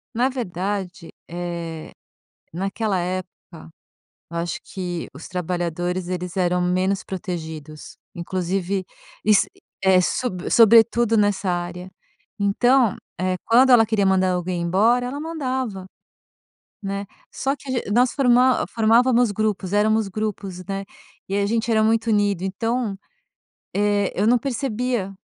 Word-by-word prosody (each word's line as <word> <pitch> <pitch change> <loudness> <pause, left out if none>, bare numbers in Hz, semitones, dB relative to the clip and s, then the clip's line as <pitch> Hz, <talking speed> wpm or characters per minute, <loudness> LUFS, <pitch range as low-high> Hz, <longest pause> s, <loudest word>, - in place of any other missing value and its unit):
Na 250 +3 +2
verdade, 190 -6 -4 0.2
eh, 170 -2 -5 0.6
naquela 195 +2 -1
época 180 -2 -6 0.6
eu 170 - -5
acho 170 +1 -3
que 180 -3 -5
os 140 - -10
trabalhadores 175 0 -2
eles 180 0 -4
eram 180 -1 +1
menos 185 +2 0
protegidos, 160 -6 -7 0.2
inclusive, 185 +2 -2 0.4
iss 210 -1 +4 0.4
eh, 190 -1 +5
sobre 185 -1 -2
sobretudo 230 0 +5
nessa 205 -2 +1
área. 175 +1 -3 0.5
Então, 240 +3 +3 0.2
eh, 185 0 0
quando 255 +3 +5
ela 225 -3 +7
queria 210 -2 +1
mandar 185 -1 +3
alguém 180 0 -2
embora 220 +8 +2
ela 280 +3 -5
mandava, 260 - -3 1.0
né, 200 +1 -3 0.3
só 275 +2 -1
que 275 - -12
ag 205 - -6
nós 245 +3 +3
forma 255 -1 +4
formávamos 235 +1 +3
grupos 205 -2 -2
éramos 215 +1 +2
grupos, 195 -3 -4
né, 195 +1 -4 0.4
e 195 - -2
a 200 0 +1
gente 225 +2 -1
era 220 -1 +3
muito 225 +1 +2
unido, 205 -4 +1
então, 225 +2 -2 0.8
eh, 205 -1 +1
eu 205 - +1
não 245 +1 +5
percebia 245 -5 -2
200 Hz, 125 wpm, -22 LUFS, 180-230 Hz, 1.0 s, ela